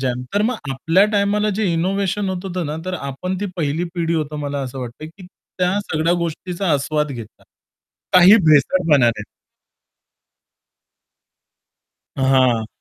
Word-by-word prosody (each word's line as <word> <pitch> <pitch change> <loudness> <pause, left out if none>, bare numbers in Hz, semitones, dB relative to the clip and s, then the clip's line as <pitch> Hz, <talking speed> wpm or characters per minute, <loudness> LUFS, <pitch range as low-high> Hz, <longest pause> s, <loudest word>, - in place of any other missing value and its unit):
जाम 125 -1 -2
तर 205 - +2
मग 240 +3 0 0.2
आपल्या 165 +8 +3
टाईमाला 205 +1 +1
जे 220 - +1
इनोव्हेशन 195 +3 -1
होत 185 0 -4
होतं 180 -3 -3
ना, 150 +1 -4
तर 185 0 -3
आपण 160 +5 -4
ती 205 - -1
पहिली 160 +1 -1
पिढी 170 -1 -1
होतं 155 -2 -2
मला 145 -1 -3
असं 135 0 -6
वाटतं 125 +5 -7
की 180 +4 -14
त्या 180 +1 -3
सगळ्या 165 -3 0
गोष्टीचा 170 +2 -3
आस्वाद 150 +1 0
घेता. 115 -4 -10 0.7
काही 185 +3 +8
भेसळपणा 155 +2 +4
नाही. 115 -3 0 2.9
हां. 130 -4 +2
165 Hz, 135 wpm, -20 LUFS, 140-185 Hz, 2.9 s, काही